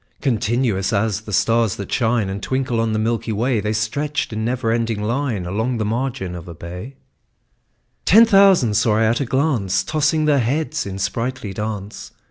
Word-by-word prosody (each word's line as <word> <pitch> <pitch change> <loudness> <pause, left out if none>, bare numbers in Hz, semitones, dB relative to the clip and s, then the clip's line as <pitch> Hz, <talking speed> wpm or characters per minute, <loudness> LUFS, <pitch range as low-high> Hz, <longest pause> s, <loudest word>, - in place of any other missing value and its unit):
Continuous 115 -5 0
as 105 0 0
the 110 - -9
stars 110 +2 +2
that 100 - -7
shine 115 -4 +1
And 95 +1 -4
twinkle 130 -2 -1
on 115 -1 0
the 110 - 0
milky 115 +1 -1
way, 115 +2 0
The 105 +1 -2
stretched 140 +5 -2
in 110 0 -3
never 120 0 -1
ending 115 -2 -1
line 120 -4 -1
Along 110 +7 -1
the 110 - -1
margin 120 -4 -2
of 90 -1 -8
a 85 - -8
bay: 90 +10 -8 1.1
Ten 225 +5 +7
thousand 195 - +5
saw 110 0 +2
I 110 - +3
at 115 +4 +1
a - - 0
glance, 130 - 0
Tossing 155 0 +1
their 145 -2 +3
heads 150 +3 -1
in 95 -1 -5
sprightly 105 +2 -3
dance. 105 0 -6
115 Hz, 180 wpm, -20 LUFS, 105-130 Hz, 1.1 s, Ten